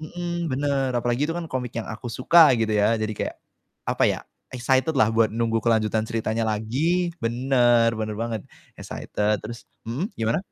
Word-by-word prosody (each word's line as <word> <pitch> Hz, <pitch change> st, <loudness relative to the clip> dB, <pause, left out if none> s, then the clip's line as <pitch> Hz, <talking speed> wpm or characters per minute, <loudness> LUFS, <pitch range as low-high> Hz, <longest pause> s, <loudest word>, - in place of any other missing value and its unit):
Mhm, 170 Hz, 0 st, -4 dB
bener, 135 Hz, -1 st, 0 dB
apalagi 120 Hz, +3 st, 0 dB
itu 165 Hz, -, -1 dB
kan 170 Hz, -2 st, -5 dB
komik 125 Hz, -3 st, -4 dB
yang -, -, -9 dB
aku 115 Hz, +1 st, -6 dB
suka, 155 Hz, +5 st, +6 dB
gitu 110 Hz, -, +1 dB
ya. 110 Hz, +2 st, +2 dB
Jadi 110 Hz, 0 st, -1 dB
kayak, -, -, -3 dB, 0.5 s
apa -, -, +2 dB
ya, -, -, +2 dB, 0.3 s
excited 130 Hz, +4 st, +1 dB
lah 130 Hz, -6 st, +3 dB
buat 115 Hz, -1 st, +2 dB
nunggu 115 Hz, 0 st, 0 dB
kelanjutan 110 Hz, -1 st, +2 dB
ceritanya 115 Hz, 0 st, -2 dB
lagi 150 Hz, +12 st, 0 dB, 0.2 s
bener, 120 Hz, -1 st, +3 dB
bener 110 Hz, -1 st, -3 dB
banget, 115 Hz, -2 st, -2 dB, 0.4 s
excited. 105 Hz, 0 st, -2 dB
Terus 115 Hz, +1 st, -8 dB, 0.2 s
mhm, 130 Hz, +10 st, -2 dB
gimana? 115 Hz, +4 st, 0 dB
120 Hz, 165 wpm, -24 LUFS, 110-140 Hz, 0.5 s, suka